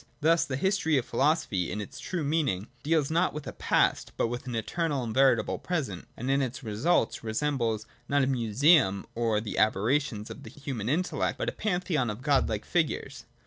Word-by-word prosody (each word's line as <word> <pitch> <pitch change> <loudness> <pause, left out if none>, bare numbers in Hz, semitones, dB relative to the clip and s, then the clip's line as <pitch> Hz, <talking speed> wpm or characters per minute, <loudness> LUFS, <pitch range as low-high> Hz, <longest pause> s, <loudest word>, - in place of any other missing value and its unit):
Thus 165 +2 +3
th 130 - -2
history 190 -4 +2
of 125 - 0
philosophy, 140 - +1
in 105 - -3
its 105 - -7
true 175 -4 -3
meaning, 140 - 0 0.2
deals 155 -1 +1
not 170 +1 +1
with 150 -1 -5
past, - - +1
but - - +1
with 120 +2 -5
an 125 - -3
eternal 145 +4 -1
and 115 -2 -4
veritable 135 +2 +3
present: 135 - -3
and, 125 +3 -2
in 140 +1 +3
it 130 +1 -3
results, 115 +4 0
resembles 115 -2 -1 0.2
not 140 0 +3
a - - +3
museum 125 - +3
of 115 -2 +1
the 105 - -3
aberrations 110 +2 +1
of - - -9
th - - -12
human 125 -6 -3
intellect, 175 +6 0
but - - -1
a - - -3
Pantheon 180 - -1
of 105 +4 -6
Godlike 130 -7 +1
figures. 170 -3 -1
135 Hz, 185 wpm, -28 LUFS, 110-155 Hz, 0.2 s, Thus